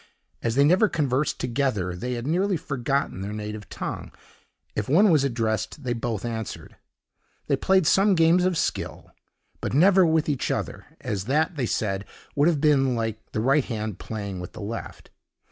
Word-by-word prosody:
As 115 Hz, 0 st, -1 dB
they 140 Hz, -, +5 dB
never 185 Hz, +8 st, +4 dB
conversed 140 Hz, -2 st, 0 dB
together, 120 Hz, -8 st, -1 dB
they 125 Hz, +8 st, -3 dB
had 120 Hz, 0 st, -4 dB
nearly 180 Hz, +5 st, +1 dB
forgotten 140 Hz, -6 st, -2 dB
their 100 Hz, +1 st, -4 dB
native 105 Hz, 0 st, -6 dB
tongue. -, -, -5 dB, 0.6 s
If 105 Hz, +2 st, -2 dB
one 190 Hz, +7 st, +5 dB
was 150 Hz, -4 st, +4 dB
addressed, 115 Hz, +1 st, -1 dB
they 125 Hz, -2 st, -1 dB
both 115 Hz, -2 st, -3 dB
answered. 110 Hz, -4 st, -5 dB, 0.7 s
They -, -, +2 dB
played 190 Hz, -3 st, +3 dB
some 195 Hz, +4 st, +4 dB
games 165 Hz, +2 st, +4 dB
of 185 Hz, -2 st, +1 dB
skill, -, -, -3 dB, 0.5 s
but -, -, -3 dB
never 190 Hz, +5 st, +6 dB
with 160 Hz, -2 st, +2 dB
each 145 Hz, -4 st, -1 dB
other; -, -, -3 dB
as 100 Hz, -2 st, -3 dB
that, 155 Hz, +7 st, +1 dB
they 130 Hz, -5 st, -1 dB
said, 100 Hz, -3 st, -1 dB, 0.3 s
would 145 Hz, +2 st, +4 dB
have 165 Hz, -4 st, +2 dB
been 135 Hz, -4 st, +3 dB
like 115 Hz, -1 st, -4 dB
the 110 Hz, -, -1 dB
right 135 Hz, +4 st, +3 dB
hand 110 Hz, -4 st, -4 dB
playing 100 Hz, -4 st, -5 dB
with 90 Hz, -, -8 dB
the 110 Hz, -, -9 dB
left. 110 Hz, +3 st, -7 dB
130 Hz, 175 wpm, -25 LUFS, 110-155 Hz, 0.7 s, never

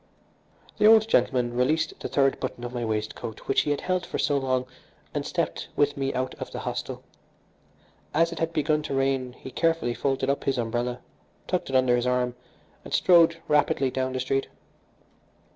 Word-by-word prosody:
The 210 Hz, -, +6 dB
old 220 Hz, 0 st, +7 dB
gentleman 125 Hz, -, +2 dB
released 135 Hz, +6 st, +1 dB
the -, -, -4 dB
third 135 Hz, -1 st, +2 dB
button 125 Hz, -2 st, -5 dB
of 120 Hz, 0 st, -5 dB
my 120 Hz, -1 st, -3 dB
waistcoat 110 Hz, 0 st, -4 dB
which 135 Hz, -, +3 dB
he -, -, -3 dB
had 145 Hz, -, 0 dB
held 185 Hz, -1 st, 0 dB
for -, -, -4 dB
so 145 Hz, -, +1 dB
long 130 Hz, -2 st, 0 dB, 0.5 s
and -, -, -1 dB
stepped -, -, -2 dB
with 145 Hz, 0 st, +2 dB
me 135 Hz, -1 st, -1 dB
out 130 Hz, 0 st, -1 dB
of -, -, -5 dB
the -, -, -6 dB
hostel. -, -, -4 dB, 1.1 s
As 165 Hz, +2 st, +2 dB
it 170 Hz, -, -6 dB
had 165 Hz, 0 st, 0 dB
begun 150 Hz, -1 st, +1 dB
to 145 Hz, -2 st, -4 dB
rain 135 Hz, -2 st, 0 dB
he 130 Hz, -, -10 dB
carefully 165 Hz, -4 st, +1 dB
folded 135 Hz, +1 st, -1 dB
up 140 Hz, +1 st, -1 dB
his 135 Hz, -, +1 dB
umbrella, 120 Hz, +1 st, -2 dB, 0.4 s
tucked 180 Hz, -5 st, -2 dB
it 135 Hz, -, -2 dB
under 130 Hz, -1 st, +4 dB
his 120 Hz, +1 st, 0 dB
arm, 125 Hz, -1 st, +1 dB, 0.5 s
and -, -, -11 dB
strode 170 Hz, -2 st, +5 dB
rapidly 145 Hz, -3 st, +2 dB
down 130 Hz, 0 st, -2 dB
the 130 Hz, -, -2 dB
street. 135 Hz, +1 st, 0 dB
135 Hz, 185 wpm, -26 LUFS, 125-150 Hz, 1.1 s, old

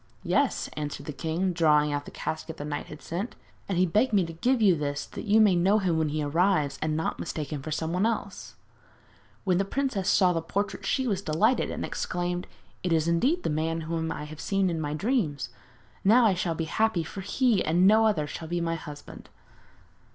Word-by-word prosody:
'Yes,' -, -, +1 dB
answered 150 Hz, -1 st, -5 dB
the 150 Hz, -, -5 dB
king, 170 Hz, +5 st, -1 dB
drawing 150 Hz, -3 st, +3 dB
out 145 Hz, 0 st, -2 dB
the -, -, -8 dB
casket 160 Hz, 0 st, -5 dB
the 145 Hz, -, -5 dB
knight 145 Hz, -1 st, -4 dB
had 150 Hz, -, -11 dB
sent, 185 Hz, +8 st, -4 dB, 0.3 s
'and 190 Hz, -, 0 dB
he 185 Hz, -, +4 dB
begged 215 Hz, +8 st, +2 dB
me 195 Hz, -4 st, +4 dB
to 165 Hz, -, -7 dB
give 245 Hz, +10 st, +1 dB
you 200 Hz, -5 st, +5 dB
this 145 Hz, -2 st, -3 dB
that -, -, -8 dB
you 215 Hz, +1 st, +4 dB
may 210 Hz, -4 st, +5 dB
know 190 Hz, +5 st, +4 dB
him 180 Hz, -6 st, +1 dB
when 155 Hz, -1 st, +1 dB
he 150 Hz, +1 st, -1 dB
arrives 155 Hz, -1 st, +1 dB
and 155 Hz, 0 st, 0 dB
not 160 Hz, -, -2 dB
mistake 150 Hz, -2 st, -4 dB
him 145 Hz, -, -4 dB
for 155 Hz, -, -6 dB
somebody 165 Hz, +6 st, 0 dB
else.' 210 Hz, -3 st, -4 dB, 0.9 s
When 185 Hz, -2 st, +2 dB
the -, -, +3 dB
princess 205 Hz, -3 st, -1 dB
saw 185 Hz, -3 st, +4 dB
the 165 Hz, -, -1 dB
portrait 200 Hz, +5 st, -3 dB
she 265 Hz, -, +1 dB
was 200 Hz, -6 st, 0 dB
delighted, 200 Hz, +9 st, +2 dB
and -, -, -3 dB
exclaimed: 175 Hz, 0 st, -3 dB, 0.3 s
'It 180 Hz, -, -2 dB
is 160 Hz, -1 st, +2 dB
indeed 260 Hz, -, +2 dB
the -, -, 0 dB
man 160 Hz, +2 st, -1 dB
whom 160 Hz, 0 st, -2 dB
I 150 Hz, -, -5 dB
have 150 Hz, +1 st, -9 dB
seen 195 Hz, -2 st, +1 dB
in 165 Hz, -1 st, -2 dB
my 150 Hz, 0 st, -2 dB
dreams! 195 Hz, -, -1 dB, 0.5 s
Now 230 Hz, +5 st, +6 dB
I 210 Hz, -, +5 dB
shall 175 Hz, -2 st, -1 dB
be 165 Hz, -, -2 dB
happy, 215 Hz, +1 st, +1 dB
for 195 Hz, +4 st, -7 dB
he 220 Hz, +1 st, +2 dB
and 175 Hz, +4 st, +3 dB
no 220 Hz, +2 st, +6 dB
other 180 Hz, -9 st, +1 dB
shall 160 Hz, +2 st, -7 dB
be 175 Hz, +1 st, -1 dB
my 165 Hz, -1 st, -1 dB
husband.' 150 Hz, -3 st, -9 dB
170 Hz, 215 wpm, -27 LUFS, 155-200 Hz, 0.9 s, Now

